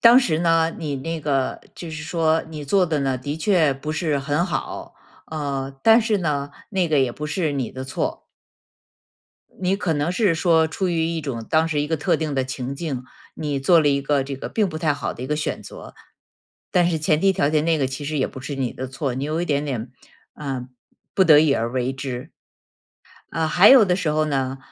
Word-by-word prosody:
当 240 +2 +8
时 165 -10 +1
呢， 165 -1 +2
你 150 -4 -3
那 165 +4 -4
个 135 -3 -1 0.2
就 170 - -7
是 155 -1 -6
说 160 0 +1
你 150 -2 -7
做 190 +5 +3
得 160 -3 -1
呢 135 -2 0
的 145 +4 -4
确 160 -4 +3
不 150 +3 -5
是 155 -3 0
很 145 +5 0
好。 175 - -4 0.3
呃， 140 -3 -3
但 225 +1 +7
是 220 -3 +1
呢， 145 -4 -1 0.2
那 185 -4 +1
个 150 -2 +3
也 130 -2 +2
不 150 - -6
是 155 0 -1
你 130 -5 -2
的 130 0 -7
错。 130 - -3 1.4
你 185 +1 +1
可 190 -5 -1
能 145 +3 0
是 195 -4 +2
说 160 -1 +3
出 185 +3 -2
于 165 -2 +1
一 165 -1 -2
种 125 -6 -5
当 160 +1 +3
时 150 -2 0
一 145 - -1
个 160 +1 0
特 145 - +1
定 155 -3 -3
的 130 -1 +1
情 130 0 -5
境， 135 -5 -4 0.3
你 145 -3 -2
做 165 +4 +5
了 150 - +3
一 140 -1 +1
个 140 -1 +1
这 135 0 -5
个 - - -6
并 210 -4 +1
不 155 - -6
太 155 -3 +1
好 140 - -4
的 125 - -8
一 - - -4
个 150 +2 -1
选 155 - -3
择。 - - -11 0.8
但 175 -1 +3
是 160 - 0
前 155 0 +1
提 195 0 +4
条 145 -5 +1
件 155 0 +1
那 165 -2 +2
个 135 - +1
其 130 +3 -6
实 150 0 -2
也 130 - +2
不 130 - -9
是 140 +2 -5
你 130 -3 -2
的 130 - -5
错， 135 -1 -3
你 135 +2 -3
有 155 +3 -1
一 - - 0
点 145 -2 0
点 125 -4 -4 0.4
呃， 130 -4 -5 0.5
不 190 - +4
得 155 -3 +8
已 150 -3 +3
而 115 +2 -2
为 130 0 -1
之。 130 +1 -6 1.0
呃， 160 +1 0
还 190 +6 +6
有 260 -5 +9
的 180 -1 +1
时 170 -5 -1
候 155 +1 +2
呢， 135 -2 -1
150 Hz, 245 characters per minute, -22 LUFS, 135-165 Hz, 1.4 s, 有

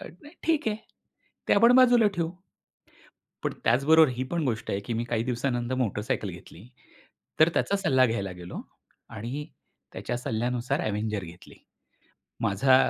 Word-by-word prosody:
अ, - - -9 0.2
नाही, 295 +3 -14
ठीक 315 -7 +1
आहे. 210 - -1 0.7
ते - - +5
पण 235 +1 +8
बाजूला 245 -3 +6
ठेवू. 165 -2 -1 1.1
पण - - 0
त्याचबरोबर 150 +6 +5
ही 125 0 -3
पण 170 -2 -1
गोष्ट 115 -5 -2
आहे, 100 - -1
की 100 +4 -5
मी 115 +1 -1
काही 115 -1 -1
दिवसानंतर 120 0 -1
मोटरसायकल 110 -3 -1
घेतली. 90 +3 -12 0.7
तर 155 - +8
त्याचा 200 - +1
सल्ला 130 -9 +3
घ्यायला 100 -5 -2
गेलो 90 0 -8 0.5
आणि 120 +7 -5 0.5
त्याच्या 120 - -4
सल्ल्यानुसार 120 +4 -1
अव्हेंजर 105 -1 -2
घेतली. 85 0 -13 0.9
माझा 115 +4 +4
120 Hz, 145 wpm, -27 LUFS, 110-150 Hz, 1.1 s, पण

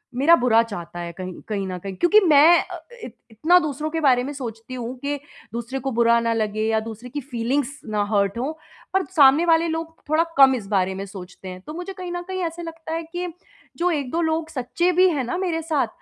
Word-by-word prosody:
मेरा 290 +7 +6
बुरा 240 -5 +4
चाहता 175 -6 -7
है 170 0 -5
कहीं 185 +1 -6
कहीं 200 -3 -2
न 185 - -4
कहीं 195 +1 -7
क्योंकि 350 - +5
मैं 325 -1 +7
अ - - -5
अ, - - -8 0.3
इत - - -9 0.2
इतना 320 +11 +4
दूसरों 305 -1 -3
के 325 +1 -2
बारे 255 -4 +4
में 285 - -4
सोचती 235 -2 -7
हूँ 245 0 -5
कि 285 +1 -2 0.4
दूसरे 235 +3 -4
को 270 - -1
बुरा 235 0 +4
ना 230 0 0
लगे 215 -1 -1
या 220 0 +2
दूसरे 225 +2 -8
की 290 +3 -4
फीलिंग्स 270 +2 -2
ना 210 -1 0
हर्ट 200 +1 +1
हों 265 +5 -1 0.4
पर 385 -1 +2
सामने 285 +2 +6
वाले 330 0 +4
लोग 325 0 -4
थोड़ा 315 +2 +4
कम 265 -1 +7
इस 205 -5 -6
बारे 190 -2 +1
में 195 +1 -5
सोचते 190 -1 -10
हैं। 185 0 -8
तो 305 - -6
मुझे 360 +3 -6
कहीं 360 -1 -7
न 350 - -3
कहीं 375 0 -3
ऐसा 335 +1 -4
लगता 325 -1 -7
है 330 - -2
कि 360 0 -3 0.5
जो 355 +1 +1
1-2 295 +1 -1
लोग 320 0 -1
सच्चे 320 +6 0
भी 365 +1 +5
है 290 -6 -1
ना 250 +9 -3
मेरे 345 -3 -1
साथ 305 -7 0
270 Hz, 230 wpm, -23 LUFS, 225-325 Hz, 0.5 s, मैं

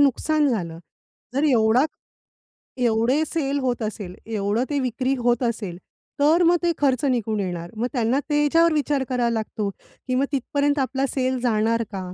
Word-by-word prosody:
नुकसान 290 +2 +3
झालं. 170 -9 -2 0.6
जर 280 +3 +1
एवढा 230 +2 +4 0.9
एवढे 240 +5 +2
सेल 285 -3 -1
होत 250 -3 -1
असेल, 205 -4 -5
एवढं 215 +1 -1
ते 285 -1 0
विक्री 255 +1 -1
होत 240 0 +1
असेल, 215 -7 -2 0.4
तर 320 +5 +4
मग 345 +1 +5
ते 340 - +3
खर्च 275 -1 +1
निघून 225 -5 0
येणार. 175 -3 -4
मग 240 +3 0
त्यांना 245 +2 +1
त्याच्यावर 305 +3 +3
विचार 290 -2 0
करावा 245 -2 +1
लागतो, 220 -2 -2
की 255 +5 -7
मग 270 - +2
तिथपर्यंत 285 +2 0
आपला 265 +1 0
सेल 260 -1 -1
जाणार 230 -1 +1
का? 195 - -4
255 Hz, 160 wpm, -23 LUFS, 220-285 Hz, 0.9 s, मग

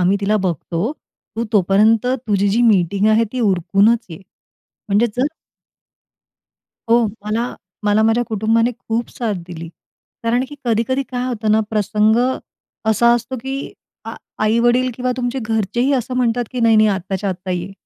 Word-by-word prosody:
आम्ही 185 +3 +3
तिला 210 +2 +1
बघतो. 175 - -2 0.4
तू 230 - -1
तोपर्यंत 210 +4 +3
तुझी 215 -6 0
जी 230 +5 +2
मीटिंग 200 -2 +3
आहे, 225 +1 +4
ती 255 - -2
उरकूनच 205 +3 +2
ये," 160 - -8 0.7
म्हणजे 210 +4 +3
जर 255 +3 +2 1.6
हो, 235 -1 +5 0.2
मला 230 +3 -2 0.3
मला 210 +1 +3
माझ्या 225 +2 +3
कुटुंबाने 225 +2 +1
खूप 230 +1 -3
साथ 225 -4 -3
दिली, 165 -2 -8 0.5
कारण 235 +2 +1
की 290 - -9
कधी-कधी 235 +4 0
काय 250 -1 -2
होतं 220 -4 -1
ना, 220 - +4
प्रसंग 215 +1 +2 0.7
असा 235 +2 +4
असतो, 240 +2 -3
की 265 +3 -5 0.3
आ - - -6 0.3
आई-वडील 240 +3 +2
किंवा 250 +1 -1
तुमचे 250 +1 -2
घरचेही 225 +4 0
असं 255 -1 -1
म्हणतात, 245 -1 +1
की 250 - -3
नाही-नाही, 220 -2 +5
आत्ताच्या-आत्ता 190 -1 -3
ये. 180 +2 -3
225 Hz, 145 wpm, -19 LUFS, 200-240 Hz, 1.6 s, हो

